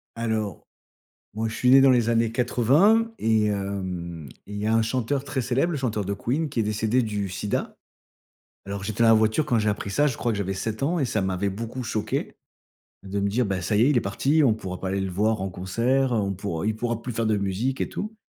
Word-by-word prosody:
Alors, 110 -3 -3 0.7
moi 110 +1 -1
je 110 - -6
suis 125 - 0
né 135 +1 +8
dans 135 - +7
les 120 -3 +3
années 115 -1 +2
80 150 - +3
et 110 -1 +2
heu 100 -1 -3 0.6
et - - -10
il - - -4
y 105 - -2
a 110 - +2
un 115 - +4
chanteur 130 +4 -1
très 135 -2 -2
célèbre, 130 +8 0
le - - -1
chanteur 110 -6 -1
de 100 - -2
Queen, 140 +10 -1
qui 120 - -2
est - - +3
décédé 110 +4 +1
du 105 -3 -2
sida. 95 +3 -3 0.9
Alors 100 0 -5
j'étais 110 +2 -1
dans 115 - +6
la - - +8
voiture 110 +6 +2
quand 120 -3 +2
j'ai 105 -1 +1
appris 100 -1 -3
ça. 145 +8 +3
Je 130 - -2
crois 120 - 0
que 105 - -2
j'avais 95 -1 -2
7 110 +4 -4
ans 170 +4 +1
et 140 - +1
ça 110 -3 -1
m'avait 95 +1 -1
beaucoup 115 +5 -5
choqué 110 -2 -3 0.7
de 100 +1 -4
me 100 - +1
dire: 120 +4 +1
«Ben 95 -2 -1
ça 105 +3 0
y 110 - +4
est, 130 - +5
il 145 - +2
est - - +4
parti». 140 +10 +1
On 120 - +5
pourra 95 -4 -5
pas 95 - -3
aller 95 +1 -1
le 95 -1 -2
voir 105 +4 +1
en 95 - -2
concert, 115 +9 0
heu, - - +2
on 100 -1 -1
pourra 95 -2 -4
il 110 0 0
pourra 115 0 -2
plus 125 - -4
faire 115 0 -1
de 110 -1 +2
musique 100 +7 -2
et - - 0
tout 215 +1 -5
110 Hz, 255 wpm, -25 LUFS, 100-125 Hz, 0.9 s, né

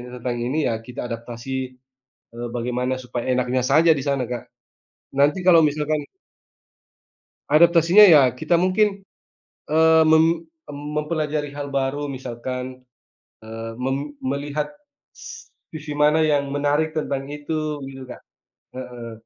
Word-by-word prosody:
tentang 120 0 -4
ini 130 +5 -2
ya - - 0
kita 125 +2 -9
adaptasi, 115 +1 -8 0.8
eee, 120 +1 -5
bagaimana 125 +2 -1
supaya 120 -1 -5
enaknya 125 0 0
saja 160 +3 +5
di 135 - -4
sana 140 -2 0
Kak. 120 - -4 0.7
Nanti 145 +6 +3
kalau 170 -3 +7
misalkan 150 0 -2 1.5
Adaptasinya 170 +5 +6
ya 155 -6 +8
kita 125 +7 -1
mungkin, 195 +3 +2 0.7
eee, 160 +1 +5
mem 160 +1 +3 0.3
mempelajari 150 0 -3
hal 145 -1 -5
baru 140 +1 -1
misalkan, 130 0 -6 0.7
eee, 115 0 -6
mem 135 +3 -2
melihat 140 +3 -2 0.5
s 465 0 -11 0.2
sisi 155 -1 -7
mana 150 +2 +3
yang 145 -2 +1
menarik 145 +2 0
tentang 140 -3 -3
itu 150 0 -3
gitu 135 -1 -9
Kak. 125 - -10 0.5
Heeh. 120 -2 -8
145 Hz, 120 wpm, -22 LUFS, 130-155 Hz, 1.5 s, ya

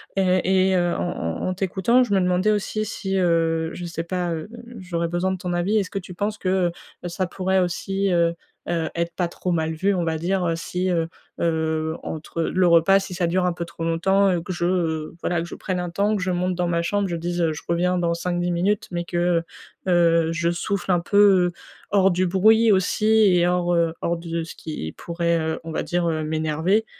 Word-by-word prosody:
et 190 0 +3
et 190 - +2
heu, 175 -1 +1
en - - -3
en 80 - -3
en 185 - 0
t'écoutant, 195 +6 +2
je 225 -5 -2
me 195 - +4
demandais 180 +3 +2
aussi 215 +1 -1
si, 195 -3 -3
heu 165 -2 +1
je 175 - -7
sais 170 -1 -4
pas, 175 0 -2
heu, 160 +2 -5 0.3
j'aurais 175 -3 -2
besoin 175 +2 -1
de 190 - -2
ton 180 0 -3
avis: 180 +5 +1
est-ce 195 - -2
que 195 - -5
tu 180 0 -10
penses 205 +3 -2
que, 185 -2 +1
heu 170 - -2 0.3
heu, 175 - -3
ça 185 +2 -2
pourrait 190 +1 0
aussi, 195 +2 -1
heu 170 -1 +2 0.3
heu, 165 -2 -1
être 170 0 -2
pas 180 - 0
trop 180 +1 -4
mal 160 -1 0
vu, 195 +5 +1
on 180 -2 0
va 160 -1 -1
dire, 185 +3 0
heu, 165 - 0
si 180 +2 -2
heu 165 -2 +1 0.3
heu, 160 -1 0
entre 160 +1 -5
le 180 +2 +2
repas 170 +3 +5
si 190 -1 -6
ça 175 -1 0
dure 180 +2 +1
un 180 - +2
peu 170 - -4
trop 170 -1 -8
longtemps 190 +4 +2
et 175 -2 0
que 180 - -6
je, 175 0 -2
heu 165 -4 -1
voilà 175 - 0
que 170 - -5
je - - -9
prenne 185 -2 -3
un 180 0 -3
temps, 205 +4 +1
que 200 - -2
je 185 - 0
monte 180 +1 0
dans 175 0 0
ma 170 -1 +1
chambre, 200 +3 0
je 175 - -3
dise, 175 +1 -2
heu: 160 -2 +1
«Je 150 - -8
reviens 180 +2 +1
dans 170 -1 +1
5-10 175 +1 -1
minutes», 190 +4 0
mais 175 -1 -2
que, 175 -1 +1 0.4
heu - - +2
heu, 165 -2 +3
je 170 0 0
souffle 190 +2 -2
un 175 - +3
peu, 200 +4 -1 0.3
heu, - - -8 0.4
hors 195 -1 +4
du 185 +1 +1
bruit 215 +5 +4
aussi 190 +2 +1
et 210 -5 +5
hors, 175 0 +1
heu, 165 -1 +2
hors 170 0 0
de 165 0 -4
ce 165 - -9
qui 115 - -6
pourrait, 170 0 -1
heu, 160 0 -2
on 165 - -7
va - - -2
dire, 175 -1 -1
heu, 155 -1 -1
m'énerver. 160 +7 0
175 Hz, 240 wpm, -23 LUFS, 170-190 Hz, 0.4 s, repas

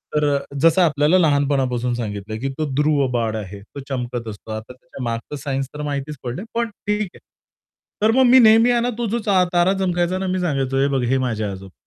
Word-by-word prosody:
तर 150 - +2
अ, - - +1 0.2
जसं 165 +3 +5
आपल्याला 155 +2 +3
लहानपणापासून 135 -5 +1
सांगितलं, 110 -2 -4
की 135 +2 -2
तो 155 - -1
ध्रुव 150 -1 +2
बाळ 115 -2 -1
आहे 100 -1 -7
तो 110 +7 -11
चमकत 120 -3 -4
असतो. 110 +1 -8
आता 110 +3 -6
त्याच्या 130 0 -11
मागचं 115 +4 -4
सायन्स 135 -2 -2
तर 150 - -6
माहितीच 145 +1 -3
पडलंय 130 - -5
पण 235 -1 0 0.2
ठीक 210 0 +1
आहे. - - -14 0.8
तर 215 - +4
मग 260 +3 +4
मी 260 - +8
नेहमी 225 +1 +6
आहे 240 -1 +2
ना 245 - 0
तो 240 - -1
जो 235 +2 -1
चा 190 -3 +4
तारा 175 +2 +3
चमकायचा 175 -1 0
आहे - - -2
ना, - - -2
मी 185 - -1
सांगायचो, 135 -6 -1
"हे 140 - +3
बघ - - 0
हे 135 - +3
माझे 115 -4 -1
आजोबा 95 -1 -7
140 Hz, 225 wpm, -21 LUFS, 120-180 Hz, 0.8 s, मी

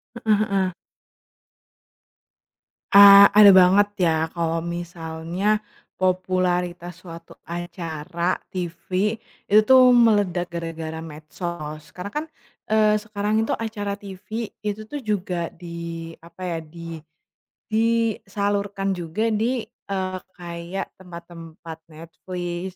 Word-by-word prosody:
Heeh 215 -3 +1
heeh. 190 -2 +1 2.2
A 200 0 +10
ada 205 -2 +8
banget 190 +2 +6 0.2
ya, 160 -1 +2
kalau 165 -1 0
misalnya 170 +4 -3 0.3
popularitas 180 -1 -1
suatu 165 -2 -12
acara 170 0 -3 0.2
TV, 185 +3 -2 0.3
itu 210 +1 +6
tuh 255 +1 +7
meledak 205 -7 +3
gara-gara 165 -1 -5
medsos. 155 0 -7
Karena 185 +3 -6
kan, 300 +1 -3 0.4
eee, 215 -1 +3
sekarang 215 +1 -1
itu - - 0
acara 205 -3 -4
TV 205 +3 -7
itu 210 0 -4
tuh 290 - -3
juga 185 -7 -2
di 170 -1 -7
apa 170 +2 -16
ya, 165 - -2
di 165 +1 -9 0.7
disalurkan 205 -3 0
juga 175 +7 -2
di 230 +3 0 0.3
eee, 185 -1 -2 0.2
kayak 170 +1 -6
tempat-tempat 170 -2 -10
Netflix, 175 +3 -6
185 Hz, 100 wpm, -23 LUFS, 170-205 Hz, 2.2 s, A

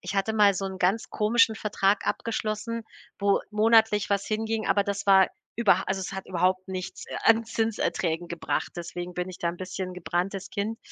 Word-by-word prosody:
ich 180 +2 -5
hatte 195 +2 +1
mal 205 -2 +5
so 195 - -3
'n 190 -1 -5
ganz 195 +6 +1
komischen 220 +1 +3
Vertrag 205 -1 +1
abgeschlossen, 225 0 -2 0.3
wo 200 -1 +2
monatlich 220 -1 +4
was 200 -1 +1
hinging, 220 0 -1
aber 200 +1 +3
das 200 0 -3
war 190 -1 +6 0.3
über 200 -5 +3
also 190 0 -1
es 185 - -5
hat 190 0 -5
überhaupt 185 +1 0
nichts, 185 -1 -5
äh, - - -6
an 225 0 +5
Zinserträgen 190 -7 -1
gebracht. 170 -1 -2
Deswegen 175 +1 -6
bin 180 +1 -3
ich 185 - -9
da 170 - -1
'n 170 - -4
bisschen 185 0 -5
gebranntes 180 +2 -3
Kind. 215 +3 -3
195 Hz, 185 wpm, -27 LUFS, 185-220 Hz, 0.3 s, war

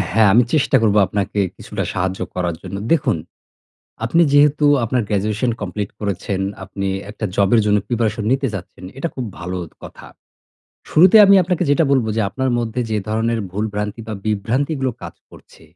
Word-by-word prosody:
হ্যাঁ। 110 -1 +5
আমি 120 +4 +6
চেষ্টা 150 - +3
করবো 105 -2 +3
আপনাকে 100 0 -2 0.2
কিছুটা - - -5
সাহায্য 95 0 -2
করার 90 -2 -1
জন্য। 100 - -6 0.2
দেখুন, 135 - +2 0.9
আপনি 165 +9 +3
যেহেতু 145 +1 +4 0.2
আপনার 120 +2 0
গ্র্যাজুয়েশন 105 +4 0
কমপ্লিট 100 +1 -4
করেছেন, 100 -1 -3 0.2
আপনি 100 0 -4 0.2
একটা 110 +1 -5
জবের 100 +3 +3
জন্য 105 0 +3
প্রিপারেশন 115 -2 -1
নিতে 135 0 +1
চাচ্ছেন, 95 -1 -8
এটা 155 - -2
খুব 130 - -4
ভালো 90 +1 -5
অ - - -13 0.2
কথা। - - -11 0.8
শুরুতেই 185 +7 +7
আমি 200 - +7
আপনাকে 180 0 -1
যেটা 160 +3 +3
বলবো 125 -5 +2
যে, - - +1
আপনার 130 0 -1
মধ্যে 115 +1 -2
যে 110 - 0
ধরনের 115 +2 0
ভুল-ভ্রান্তি 105 +2 -3
বা 110 - -3
বিভ্রান্তিগুলো 130 +7 -1
কাজ - - -8 0.2
করছে, - - -18
110 Hz, 165 wpm, -19 LUFS, 100-130 Hz, 0.9 s, শুরুতেই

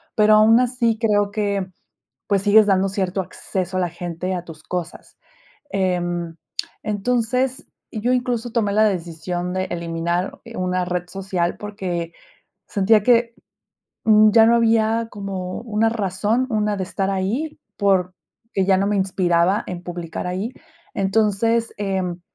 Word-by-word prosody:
pero 215 0 +5
aún 220 +2 +6
así 240 -2 +1
creo 205 -3 +2
que, 200 -3 -1 0.6
pues, 200 -2 +2
sigues 210 +1 +6
dando 195 -1 +3
cierto 190 -1 -1
acceso 185 0 -4
a - - +1
la 180 - 0
gente 175 +2 -4
a 175 - -4
tus 155 -3 -11
cosas. 175 -1 -6 0.5
Em, 175 -3 -1 0.5
entonces, 245 +4 0 0.3
yo 235 +3 0
incluso 245 -1 -1
tomé 220 -4 +1
la 215 +2 +4
decisión 175 -1 -2
de 185 0 0
eliminar, 170 +1 -2
eh, 230 0 -10
una 185 0 0
red 180 0 -3
social 185 -2 -2
porque 185 -5 -4 0.6
sentía 210 +1 +3
que 235 0 +3 1.0
ya 225 +1 +6
no 235 - +5
había 225 0 +2
como 190 -3 -5
una 225 -1 +1
razón, 215 +3 0
una 210 -2 0
de 190 - -2
estar 195 +1 -2
ahí, 215 +12 -2 0.2
porque 190 -3 +2 0.4
que 195 - +2
ya 190 0 +3
no 195 - +1
me 210 - +1
inspiraba 185 0 +2
en 180 -1 -6
publicar 175 -1 -5
ahí. 195 +8 -3 0.4
Entonces, 220 +3 +1
em, 190 -3 -2
195 Hz, 140 wpm, -21 LUFS, 180-220 Hz, 1.0 s, aún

